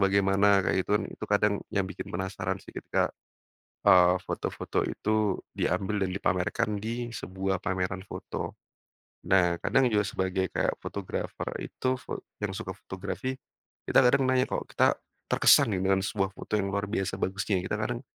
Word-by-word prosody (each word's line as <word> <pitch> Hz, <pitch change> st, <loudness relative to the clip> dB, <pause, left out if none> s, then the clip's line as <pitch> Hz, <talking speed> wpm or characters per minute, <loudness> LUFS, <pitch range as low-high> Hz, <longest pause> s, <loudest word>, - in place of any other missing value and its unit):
bagaimana? 100 Hz, 0 st, +4 dB
Kayak -, -, +1 dB
gitu -, -, -7 dB
kan. 110 Hz, -, -2 dB
Itu -, -, -7 dB
kadang 105 Hz, 0 st, +3 dB
yang 100 Hz, -2 st, 0 dB
bikin 95 Hz, -, -7 dB
penasaran 95 Hz, +1 st, -3 dB
sih -, -, -12 dB
ketika, -, -, -1 dB, 0.7 s
eee, 90 Hz, 0 st, +7 dB
foto-foto -, -, -2 dB
itu 110 Hz, -2 st, 0 dB, 0.2 s
diambil 100 Hz, +1 st, 0 dB
dan 95 Hz, -, 0 dB
dipamerkan 100 Hz, +2 st, 0 dB
di 120 Hz, +1 st, -3 dB
sebuah 95 Hz, -1 st, -2 dB
pameran 95 Hz, -1 st, -1 dB
foto. -, -, -6 dB, 0.7 s
Nah, 90 Hz, -2 st, +4 dB
kadang 130 Hz, -3 st, +3 dB
juga 105 Hz, -2 st, +2 dB
sebagai 95 Hz, -1 st, -1 dB
kayak -, -, 0 dB
fotografer 100 Hz, -2 st, -4 dB
itu 130 Hz, 0 st, -2 dB
fot -, -, -6 dB, 0.2 s
yang 105 Hz, -2 st, -3 dB
suka 105 Hz, -2 st, -5 dB
fotografi, 100 Hz, +7 st, -4 dB, 0.5 s
kita -, -, +4 dB
kadang 135 Hz, +2 st, +4 dB
nanya, 130 Hz, 0 st, +3 dB
kok -, -, -2 dB
kita -, -, +4 dB, 0.3 s
terkesan 105 Hz, -, +5 dB
nih 90 Hz, -, -1 dB
dengan 95 Hz, 0 st, +3 dB
sebuah 95 Hz, -2 st, 0 dB
foto 105 Hz, -, -6 dB
yang 100 Hz, -2 st, +1 dB
luar 100 Hz, 0 st, -1 dB
biasa 95 Hz, -2 st, -2 dB
bagusnya. 95 Hz, +1 st, 0 dB
Kita 100 Hz, -, -2 dB
kadang 120 Hz, +2 st, -2 dB
100 Hz, 160 wpm, -28 LUFS, 95-105 Hz, 0.7 s, eee